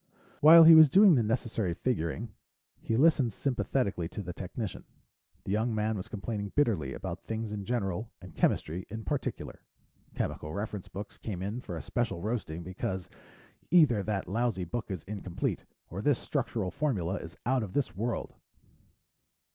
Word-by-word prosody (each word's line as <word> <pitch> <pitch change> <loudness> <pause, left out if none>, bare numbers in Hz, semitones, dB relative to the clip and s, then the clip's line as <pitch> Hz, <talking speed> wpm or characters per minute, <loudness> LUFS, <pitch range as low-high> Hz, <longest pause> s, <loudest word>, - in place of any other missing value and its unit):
While 165 +2 +10
he 165 +1 +10
was 160 -2 +9
doing 195 +3 +7
the 130 - +4
necessary 110 -5 -1
figuring, 105 0 -2 0.5
he 115 - -1
listened 135 -6 +4
sympathetically 120 -8 -1
to 105 - -6
the 90 -1 -6
technician. 95 +3 -5 0.6
The - - -4
young 110 +2 +1
man 110 +1 0
was 95 - -5
complaining 105 -1 -5
bitterly 100 - +1
about - - -6
things 110 -1 -4
in 100 -2 -5
general, 110 -2 -2
and 95 -3 -12
chemistry 85 +4 0
in 110 +1 -6
particular. 145 -4 -4 0.5
Chemical 75 +1 -3
reference 105 -2 -4
books 100 +3 -8
came 95 -5 -5
in 105 +6 -3
for - - -6
a - - -6
special 120 -7 -2
roasting, 95 -5 -3
because: 95 +1 -4 0.6
"either 150 - +5
that 100 -1 -2
lousy 110 -2 0
book 110 +7 -4
is 95 -5 -4
incomplete, 95 -3 -4 0.3
or 95 +4 -4
this 140 +3 +3
structural 120 -9 -2
formula 100 - -1
is 85 +2 -9
out 130 +1 +2
of 100 -4 -5
this 140 -10 -1
world." 115 +4 -3
110 Hz, 160 wpm, -30 LUFS, 95-120 Hz, 0.6 s, While